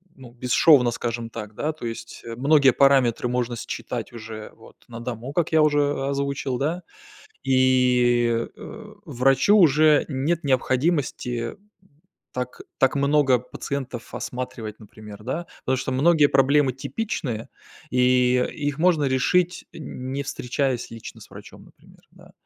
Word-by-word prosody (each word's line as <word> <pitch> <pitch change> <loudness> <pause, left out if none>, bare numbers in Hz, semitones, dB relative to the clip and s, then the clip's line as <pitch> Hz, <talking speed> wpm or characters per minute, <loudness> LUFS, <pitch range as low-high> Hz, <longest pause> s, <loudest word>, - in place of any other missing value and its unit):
ну, 125 -3 -13
бесшовно, 125 +1 +4
скажем 115 0 -4
так, 105 -2 -8
да, 155 +8 -2
то 155 -5 -9
есть 115 0 -7
многие 140 0 +5
параметры 135 -4 +3
можно 120 -1 -1
считать - - -6
уже 110 -2 -8
вот - - -17
на 115 0 -9
дому, 120 +2 -6
как 170 0 0
я 160 -1 +4
уже 145 -2 +1
озвучил, 140 -2 -2
да. 160 +7 -2 0.6
И, 125 -3 +3
э, 215 -1 -10
врачу 135 - +3
уже 155 -4 +5
нет 150 +5 -1
необходимости 130 -3 0 0.8
так 125 0 -5 0.2
так 135 +1 +3
много 140 -2 +3
пациентов 125 -1 -6
осматривать, 115 -4 -6
например, 105 0 -12
да. 160 +9 -3 0.2
Потому 130 - +1
что 130 - -3
многие 150 +2 +4
проблемы 135 0 +3
типичные, 135 - -4 0.4
и 125 0 +3
их 145 -1 -3
можно 165 -4 +3
решить, 175 +7 +1
не 135 -2 -6
встречаясь 130 -1 -2
лично 115 -1 -10
с - - -14
врачом, - - -13
например, - - -21
да. - - -18
130 Hz, 130 wpm, -23 LUFS, 120-145 Hz, 0.8 s, многие